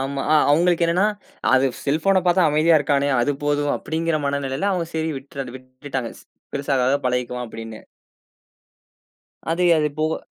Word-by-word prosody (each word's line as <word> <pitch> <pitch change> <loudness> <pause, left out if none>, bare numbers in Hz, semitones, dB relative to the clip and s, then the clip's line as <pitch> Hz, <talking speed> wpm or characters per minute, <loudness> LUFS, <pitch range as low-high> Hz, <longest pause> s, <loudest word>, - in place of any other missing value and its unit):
ஆமா, 135 +1 -3
அ - - +6 0.2
அவங்களுக்கு 170 +3 +3
என்னன்னா, 180 +5 +2 0.5
அது 130 +1 +4 0.2
செல்போன 165 +7 +2
பாத்தா 180 +1 +4
அமைதியா 155 +2 +4
இருக்கானே, 140 0 +1
அது 145 +4 +1
போதும் 145 0 +1
அப்படிங்கிற 160 0 -2
மனநிலைல 140 +6 -1
அவங்க 175 -3 -1
சரி 160 0 -1
விட்ரு 135 -2 -8
விட்டுட்டாங்க. 130 -1 -6
ஸ் - - -20 0.3
பெருசாகாக 135 -1 +1
பழகிக்குவான் 125 0 -2
அப்படின்னு. 115 -1 -9 1.7
அது-அது 165 -3 +3
போக 155 +1 0
145 Hz, 135 wpm, -22 LUFS, 135-165 Hz, 1.7 s, அ